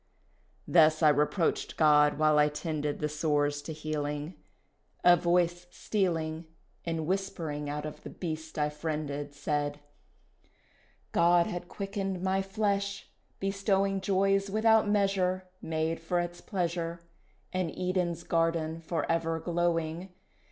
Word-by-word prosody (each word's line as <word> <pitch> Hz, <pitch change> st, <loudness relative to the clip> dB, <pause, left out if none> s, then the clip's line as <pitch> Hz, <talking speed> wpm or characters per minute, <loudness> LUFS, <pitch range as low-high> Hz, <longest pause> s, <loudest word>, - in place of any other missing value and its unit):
Thus 155 Hz, -1 st, +5 dB
I 155 Hz, -, +8 dB
reproached 150 Hz, +4 st, +1 dB
God 150 Hz, -2 st, +5 dB
while 155 Hz, -1 st, +4 dB
I 150 Hz, 0 st, +5 dB
tended 150 Hz, -1 st, -3 dB
The 150 Hz, -, +1 dB
sores 145 Hz, -1 st, 0 dB
to 150 Hz, -, -7 dB
healing 150 Hz, 0 st, -3 dB, 0.7 s
A 175 Hz, 0 st, +8 dB
voice 175 Hz, 0 st, +1 dB
stealing 165 Hz, -6 st, -1 dB, 0.4 s
And 165 Hz, -2 st, -2 dB
whispering 165 Hz, -5 st, -2 dB
out 150 Hz, +1 st, -3 dB
of 155 Hz, -, -7 dB
the -, -, -8 dB
beast 160 Hz, -2 st, -6 dB
I 150 Hz, 0 st, +1 dB
friended, 150 Hz, -2 st, -4 dB
Said, 145 Hz, 0 st, -2 dB, 1.3 s
"God 170 Hz, 0 st, +4 dB
had 175 Hz, 0 st, -5 dB
quickened 195 Hz, -2 st, -4 dB
my 190 Hz, 0 st, +1 dB
flesh, 200 Hz, 0 st, -2 dB, 0.3 s
bestowing 195 Hz, 0 st, +1 dB
Joys 195 Hz, +1 st, +2 dB
without 220 Hz, +1 st, +4 dB
measure, 190 Hz, -2 st, +1 dB
Made 160 Hz, +1 st, -1 dB
for 170 Hz, +2 st, -1 dB
its 175 Hz, 0 st, -4 dB
pleasure, 170 Hz, -3 st, -2 dB, 0.5 s
An 185 Hz, -2 st, 0 dB
Eden's 180 Hz, -2 st, -1 dB
garden 165 Hz, -1 st, 0 dB
for 165 Hz, -1 st, -2 dB
ever 165 Hz, 0 st, 0 dB
glowing. 170 Hz, +1 st, -1 dB
165 Hz, 125 wpm, -30 LUFS, 155-185 Hz, 1.3 s, I